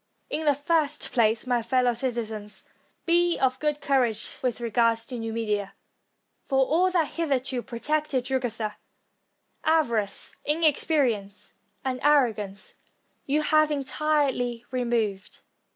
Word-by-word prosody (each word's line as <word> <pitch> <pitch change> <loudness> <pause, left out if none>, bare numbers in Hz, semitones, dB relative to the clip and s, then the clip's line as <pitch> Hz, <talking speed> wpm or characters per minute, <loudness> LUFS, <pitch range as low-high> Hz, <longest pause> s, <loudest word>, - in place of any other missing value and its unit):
In 310 +1 -2
the 290 -2 +4
first 300 0 0
place, 225 -1 +2
my 245 -2 +1
fellow 250 +1 +2
citizens, 225 -4 -4 0.4
be 345 0 +3
of 260 -1 +1
good 300 -1 -1
courage 245 -6 +1
with 250 -3 -1
regard 230 0 +2
to 235 +2 -6
Numidia; 215 -3 -2 0.7
for 265 -1 +2
aU 360 +4 +4
that 340 -5 +1
hitherto 275 -5 -1
protected 270 +2 -1
Jugurtha, 235 -5 -2 0.9
avarice, 235 -11 +1
inexperi 300 -3 +2
ence, 200 0 -12 0.3
and 255 -1 -1
arrogance, 225 -9 +1 0.5
you 300 +2 +2
have 310 0 +4
entirely 275 -4 0
removed. 235 -6 -2
255 Hz, 115 wpm, -26 LUFS, 230-295 Hz, 0.9 s, the